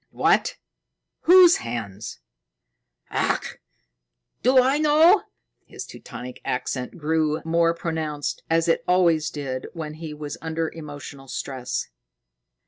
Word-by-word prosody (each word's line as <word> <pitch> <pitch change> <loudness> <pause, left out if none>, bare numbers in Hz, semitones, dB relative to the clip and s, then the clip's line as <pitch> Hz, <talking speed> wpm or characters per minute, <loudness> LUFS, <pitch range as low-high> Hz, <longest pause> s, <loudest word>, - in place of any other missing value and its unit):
"What! - - +2 0.7
Whose 360 -1 +9
hands?" 110 - -6 0.9
"Ach! - - -1 0.8
Do 255 +2 +5
I 265 +3 +3
know?" 315 +6 +5 0.4
His - - -8
Teutonic 125 0 -9
accent 125 +3 -3
grew 155 -1 0
more 165 0 +2
pronounced, 155 -3 -3
as 165 +1 +2
it 165 - +2
always 170 -3 +3
did 135 -4 -5
when 155 -3 -5
he 155 0 -7
was 150 -1 -6
under 160 0 -2
emotional 145 -3 -9
stress. 125 - -4
160 Hz, 110 wpm, -24 LUFS, 140-170 Hz, 0.9 s, Whose